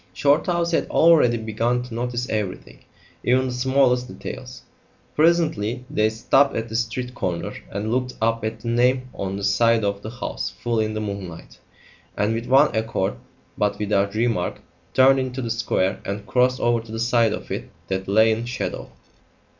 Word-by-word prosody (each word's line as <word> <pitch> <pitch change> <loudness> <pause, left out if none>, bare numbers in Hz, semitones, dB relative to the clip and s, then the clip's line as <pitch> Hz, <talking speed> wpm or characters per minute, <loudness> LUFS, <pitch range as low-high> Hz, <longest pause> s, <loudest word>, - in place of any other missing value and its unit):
Shorthouse 170 - +2
had 165 - 0
already 160 -8 +5
begun 115 +2 -1
to 125 -1 -10
notice 120 +1 -2
everything, 105 -4 -4 0.4
even 130 +1 +2
the - - -4
smallest 125 0 +2
details. 125 0 -8 0.5
Presently 155 -8 +2
they 110 -6 +2
stopped 135 +5 +2
at 115 +1 -3
the 110 - -6
street 120 +2 -2
corner 90 -8 -3 0.2
and 105 +3 -3
looked 125 +1 -1
up 115 0 0
at 110 0 -4
the - - -7
name 125 +2 +2
on 95 0 -4
the 100 - -6
side 115 +3 +3
of 100 0 -2
the 110 - -6
house 120 +1 -4
full 120 -1 -1
in 110 0 -1
the 110 - -2
moonlight, 100 -5 -7 0.6
and 105 +2 +1
with 115 +1 -4
one 135 +1 +5
accord, 110 -4 -1 0.5
but 105 0 +1
without 100 -1 0
remark, 115 -5 0 0.3
turned 135 +1 +6
into 130 0 -3
the 120 -3 -2
square 95 -4 0
and 100 +1 -5
crossed 125 +2 +2
over 120 -1 +2
to 110 - -12
the 115 - -4
side 115 -1 +3
of - - -6
it - - -4 0.2
that 95 0 -3
lay 110 +3 +4
in 110 +2 -1
shadow. 125 +1 -4
115 Hz, 175 wpm, -23 LUFS, 110-125 Hz, 0.6 s, turned